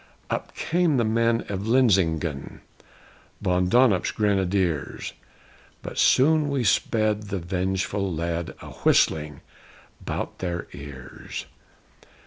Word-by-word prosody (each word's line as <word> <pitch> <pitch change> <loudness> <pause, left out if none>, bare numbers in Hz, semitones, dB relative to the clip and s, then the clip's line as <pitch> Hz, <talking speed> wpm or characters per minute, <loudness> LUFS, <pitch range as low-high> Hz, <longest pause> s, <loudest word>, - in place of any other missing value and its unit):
Up - - -3
came 170 -4 +1
the 120 - +3
men 115 +1 +1
of 100 +1 -4
Linsingen, 90 - +1 0.8
Von 90 -2 +1
Donop's 120 -5 +4
Grenadiers! 95 -6 0 0.7
But - - -5
soon 150 +2 +4
we 140 -3 0
sped 110 +1 +1
the 100 -1 -2
vengeful 95 +2 -1
lead 85 +1 -3
A - - -8
whistling 75 -2 +2 0.6
'bout - - -4
their 85 -2 -3
ears! 70 -3 -8
95 Hz, 105 wpm, -25 LUFS, 85-115 Hz, 0.8 s, Donop's